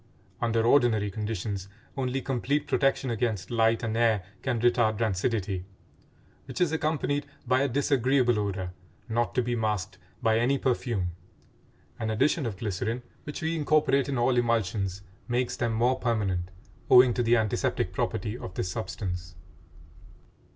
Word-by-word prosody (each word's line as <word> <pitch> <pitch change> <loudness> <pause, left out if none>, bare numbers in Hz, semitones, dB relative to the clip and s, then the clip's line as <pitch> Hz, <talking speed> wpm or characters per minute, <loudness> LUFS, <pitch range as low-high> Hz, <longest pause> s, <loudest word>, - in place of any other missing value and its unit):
Under 115 -1 +1
ordinary 115 -6 +3
conditions, 100 -2 -4 0.3
only 135 0 -2
complete 140 +3 0
protection 135 -3 +1
against 115 -4 -2
light 115 0 +2
and 110 -1 -1
air 115 -4 +3 0.2
can 130 -4 -1
retard 120 -2 +3
rancidity, 100 -3 -1 0.8
which - - -6
is 175 -4 +3
accompanied 150 -2 -1 0.2
by 130 +1 +3
a 140 - +2
disagreeable 130 -3 +2
odor 95 -3 -2 0.4
not 120 +1 -1
to 125 - +2
be 120 0 -1
masked 105 -4 -2 0.2
by 110 0 +2
any 130 +4 +2
perfume; 120 -9 -1 0.9
an 110 - -2
addition 135 +6 +1
of 100 -4 -5
glycerin, 110 +4 -2 0.2
which 150 +2 -6
we 165 +1 0
incorporate 145 -3 +2
in 135 - -1
all 120 +1 +2
emulsions, 105 -5 0 0.2
makes 125 0 0
them 120 -1 -1
more 120 +3 +2
permanent 95 -7 -1 0.4
owing 125 -1 +8
to 125 - 0
the 120 0 +4
antiseptic 110 -2 0
property 105 +3 -2
of 95 -6 -8
this 90 - -2
substance. 90 -5 -5
115 Hz, 145 wpm, -28 LUFS, 105-130 Hz, 0.9 s, owing